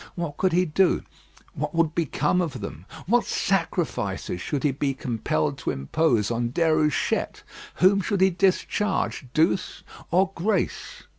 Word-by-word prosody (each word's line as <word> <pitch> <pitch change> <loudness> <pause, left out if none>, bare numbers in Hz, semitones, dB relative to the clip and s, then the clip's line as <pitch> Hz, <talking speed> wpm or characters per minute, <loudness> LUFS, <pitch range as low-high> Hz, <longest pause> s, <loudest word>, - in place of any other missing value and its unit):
What 170 -5 -4
could 185 -1 +2
he 180 +2 +3
do? 180 +4 +2 0.5
What - - -4
would 165 -2 +2
become 165 +1 +1
of 165 -5 -3
them? 95 -3 -8 0.2
What 235 +5 +3
sacrifices 165 - -1
should 145 +5 -3
he 145 - +3
be 135 0 -1
compelled 115 - -1
to - - -3
impose 110 - +1
on 120 0 -1
Déruchette? 155 0 +1 0.3
Whom 195 +2 +4
should 195 0 -1
he 190 0 +5
discharge 190 -4 0
Douce 165 +4 +1 0.3
or 190 +2 +2
Grace? 200 +6 -2
165 Hz, 140 wpm, -25 LUFS, 130-185 Hz, 0.5 s, he